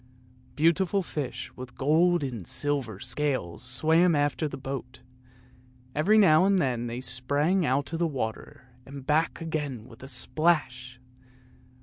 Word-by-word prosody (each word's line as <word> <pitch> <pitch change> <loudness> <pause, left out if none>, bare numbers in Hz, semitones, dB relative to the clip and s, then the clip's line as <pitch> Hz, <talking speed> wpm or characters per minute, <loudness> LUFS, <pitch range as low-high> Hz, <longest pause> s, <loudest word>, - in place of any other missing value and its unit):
Beautiful 180 +5 +2
fish 145 -7 -5
with 125 -1 -9
gold 165 +4 +3
and 120 -10 -5
silver 135 -9 0
scales 135 -13 -1
swam 160 +7 +2
after 145 +2 0
the - - -7
boat; 135 -1 -7 0.9
every 195 +9 +3
now 180 -5 +6
and 195 0 +3
then 125 -8 0
they 120 +2 -5
sprang 145 +8 0
out 140 +5 0
of 165 - -2
the 170 - +2
water 125 -2 -5
and 135 +1 -10
back 155 +3 +1
again 150 -8 -4
with 115 - -15
a 130 - -9
splash. 130 -2 0
145 Hz, 135 wpm, -27 LUFS, 125-165 Hz, 0.9 s, now